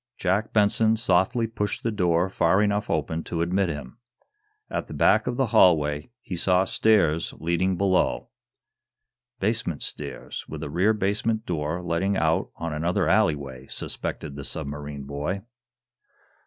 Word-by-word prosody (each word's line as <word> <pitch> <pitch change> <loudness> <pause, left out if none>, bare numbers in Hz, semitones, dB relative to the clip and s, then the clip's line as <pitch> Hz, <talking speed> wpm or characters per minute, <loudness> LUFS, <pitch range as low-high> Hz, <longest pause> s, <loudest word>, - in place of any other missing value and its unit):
Jack 95 +4 0
Benson 110 +1 +3
softly 110 +2 +2
pushed 105 -2 -3
the 115 - 0
door 90 -3 +2
far 95 0 +2
enough 105 0 0
open 80 0 -1
to 85 -1 -1
admit 95 +2 +1
him. 75 - -7 0.7
At - - -3
the - - -8
back - - +3
of 125 - -1
the 135 - +3
hallway 75 -6 +4
he 95 - -5
saw 90 +2 +3
stairs 95 -7 +2
leading 85 +3 0
below. 95 -1 +1 1.1
"Basement 100 -7 -1
stairs, - - -6
with - - -6
a 70 - -5
rear 95 +7 +3
basement 110 +2 -1
door 85 +1 -2
letting 90 +3 0
out 80 0 +1
on 85 -1 -4
another 85 +4 0
alleyway!" 70 -3 +1
suspected 75 -4 -5
the 70 - -6
submarine 70 -1 -5
boy. 75 +8 -4
90 Hz, 140 wpm, -25 LUFS, 80-100 Hz, 1.1 s, hallway